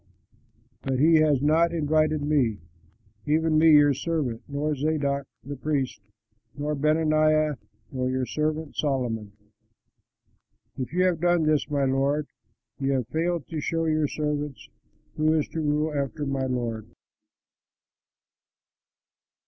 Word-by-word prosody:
But 135 -1 -1
he 160 +4 +5
has 150 -3 +3
not 160 +3 +3
invited 155 -1 +1
me, 140 -8 +1 0.7
even 155 +1 +2
me 160 0 +6
your 145 -1 +6
servant, 140 -5 -2
nor 145 +2 -1
Zadok, 140 -1 -1 0.2
the 140 +3 -6
priest, 135 -4 -2 0.6
nor 150 +1 -2
Benaiah 155 0 +2 0.3
nor 130 -1 -2
your 130 0 -1
servant 155 +2 -2
Solomon. 120 -8 -2 1.4
If 130 -1 -5
you 180 +2 +1
have 180 -3 +1
done 175 -1 +3
this, 155 -1 +1
my 140 -2 +1
lord, 140 +3 +1 0.5
you 135 0 0
have 130 -4 -2
failed 170 -1 -1
to 160 -3 -4
show 165 +2 -1
your 155 -1 +1
servants 150 -2 -3 0.5
who 155 0 +3
is 150 - 0
to 160 - -4
rule 150 +1 0
after 140 +1 -2
my 135 -1 -1
lord." 115 -4 -3
150 Hz, 125 wpm, -26 LUFS, 135-155 Hz, 1.4 s, me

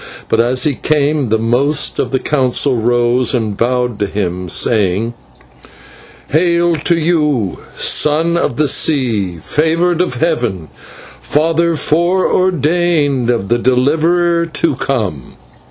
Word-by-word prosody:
But 115 - +1
as 125 +2 +1
he 150 - +2
came 145 -2 0
the 110 - +2
most 130 +7 0
of - - -1
the 135 - 0
Council 130 -1 0
rose 120 +2 +1
and 110 -4 -2
bowed 125 0 -1
to 100 - 0
him, 90 -3 -4
crying: 105 +3 0 1.2
"Hail 170 +2 +2
to 165 +3 0
you! 150 - 0 0.2
Son 160 +3 +1
of 170 - -1
the 150 0 +2
Sea, 115 - 0
Favoured 165 - 0
of 180 -8 -2
Heaven, 120 - -2 0.5
Father 165 +2 0
fore 175 +5 +1
ordained 160 -7 +1
of 115 -5 -1
the 120 - +1
Deliverer 165 +7 +1
to 155 -2 -1
come!" 105 - -3
140 Hz, 125 wpm, -14 LUFS, 120-165 Hz, 1.2 s, he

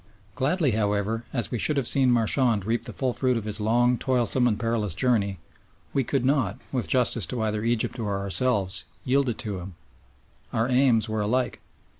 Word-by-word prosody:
Gladly, 150 +1 +1
however, 105 +1 -1
as 120 -4 -2
we 120 - -2
should 150 +5 0
have 135 -4 0
seen 135 -2 +2
Marchand 115 -2 +2
reap 115 +1 -1
the 120 - -6
full 130 -1 -2
fruit 125 -1 +1
of 115 - -3
his 105 0 -2
long, 120 +3 +2
toilsome, 125 -1 +2
and 105 -3 0
perilous 115 -6 -1
journey, 105 -6 +1 0.6
we 135 - +2
could 130 0 -1
not, 130 -8 +1
with 125 -3 -2
justice 120 -6 +2
to 120 -3 -3
either 105 0 -1
Egypt 120 +1 -1
or 105 -3 -1
ourselves, 100 -1 +1 0.2
yield 135 +1 +2
it 115 - -3
to 100 -4 -4
him. 90 0 -9 0.8
Our 115 +2 0
aims 125 -4 +3
were 110 -1 -2
alike. 125 +5 0
115 Hz, 185 wpm, -25 LUFS, 105-125 Hz, 0.8 s, aims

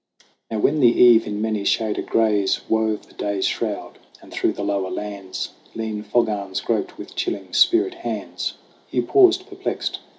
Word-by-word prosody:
Now 110 - -3
when 145 +8 +2
the 125 - +6
eve 120 -1 +6
in 105 0 -3
many 110 -2 -1
shaded 110 +1 0
grays 105 -4 +1
Wove 110 -1 0
the - - -21
day's 100 -2 -2
shroud, - - -3 0.2
and - - -16
through - - +1
the 100 - -5
lower 100 -2 -1
lands 100 -2 -5 0.3
Lean 110 -2 -3
fog 110 +3 +1
arms 100 -3 -3
groped - - -2
with - - -10
chilling 95 -2 -3
spirit 365 +2 +4
hands, 345 0 -4 0.3
Hugh - - 0
paused 375 -1 +5
perplexed. 390 -1 -4
110 Hz, 165 wpm, -22 LUFS, 100-120 Hz, 0.3 s, the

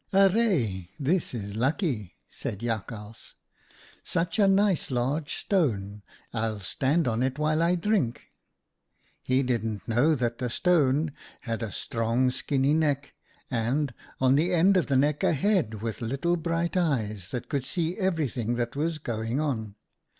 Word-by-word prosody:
" - - -52
' - - -27
Arre! 190 - +3
this 160 +5 +1
is 100 -3 -5
lucky,' 125 - -1
said 105 - -6
Jakhals. 110 -1 -5 0.3
' - - -27 0.3
Such 170 +5 -1
a 200 - +6
nice 195 -2 +3
large 135 +4 -1
stone! 105 - 0 0.3
I'll 110 -2 -1
stand 135 - 0
on 115 0 0
it 130 +1 0
while 155 +1 +1
I 170 +2 +3
drink.' 175 - -1 0.9
"He 130 +1 +1
didn't 115 -4 -2
know 125 +8 +3
that 120 -3 -1
the 125 - -1
stone 150 0 +2 0.3
had 115 -1 -3
a 110 -3 -3
strong 115 +6 0
skinny 135 +2 +1
neck, 145 -3 0 0.4
and, 125 +3 0 0.3
on 130 0 +4
the 160 +6 +2
end 185 +4 +5
of 180 - +2
the 135 - +2
neck, 145 +2 +2
a - - +4
head 145 - +1
with 115 0 -4
little 135 +9 0
bright 170 +1 -1
eyes 110 - 0
that 125 - -4
could 140 -4 -1
see 170 +4 -2
everything 145 - 0
that 120 +1 -2
was 160 +2 -1
going 115 -2 -2
on. 110 -9 -2
135 Hz, 155 wpm, -27 LUFS, 115-165 Hz, 0.9 s, a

